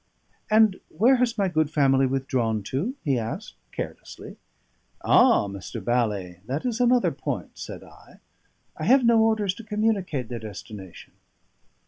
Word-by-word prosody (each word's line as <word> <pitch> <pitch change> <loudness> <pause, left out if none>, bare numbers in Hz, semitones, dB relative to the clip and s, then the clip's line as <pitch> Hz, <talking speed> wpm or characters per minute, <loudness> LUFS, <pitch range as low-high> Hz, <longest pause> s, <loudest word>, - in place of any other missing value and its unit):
"And 215 -3 +4
where 240 +10 +3
has 240 -2 0
my 200 -2 +2
good 155 -4 +1
family 135 -3 +3
withdrawn 125 -5 -1
to?" 160 - -3
he 135 -4 +1
asked 115 0 -5 0.2
carelessly. - - -8 0.7
"Ah! - - +5
Mr. 100 +4 -7
Bally, 105 -6 -1
that 135 - -3
is 240 -2 -1
another 245 0 +3
point," - - -5
said - - -8
I. - - -18 0.6
"I - - -5
have 260 -1 +5
no 230 -1 +5
orders 220 -4 +2
to 230 - -11
communicate 210 - -1
their 120 0 -5
destination." 105 -3 -10
150 Hz, 140 wpm, -25 LUFS, -, 0.7 s, Ah